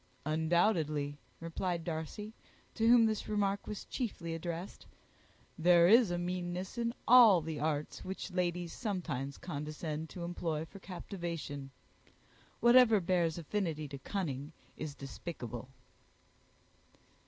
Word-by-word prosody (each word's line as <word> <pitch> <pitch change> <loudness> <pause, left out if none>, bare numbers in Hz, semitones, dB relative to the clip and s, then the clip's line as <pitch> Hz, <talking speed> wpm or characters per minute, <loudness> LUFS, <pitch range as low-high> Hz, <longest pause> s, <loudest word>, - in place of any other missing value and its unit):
"Undoubtedly," 155 -2 +1 0.2
replied 165 +1 -2
Darcy, 170 +7 -5 0.4
to 225 0 +1
whom 235 -1 +7
this 215 -1 -1
remark 200 -1 0
was 210 - -5
chiefly 180 -9 -4
addressed, 170 +2 -5 0.7
"there 170 0 +6
is 225 -1 +6
meanness 175 +2 -3
in 235 -1 0 0.2
all 230 -7 +9
the 160 -1 -5
arts 150 -1 -2
which 190 +1 -5
ladies 175 -2 -1
sometimes 150 - -3
condescend 155 0 -5
to 175 - -7
employ 165 -2 -2
for 195 +4 -13
captivation. 170 -7 -6 0.9
Whatever 240 -2 +7
bears 170 -3 +1
affinity 165 -3 -2
to 140 -1 -7
cunning 145 -3 -4 0.2
is 150 -2 -6
despicable." 130 -4 -7
170 Hz, 110 wpm, -33 LUFS, 155-195 Hz, 0.9 s, all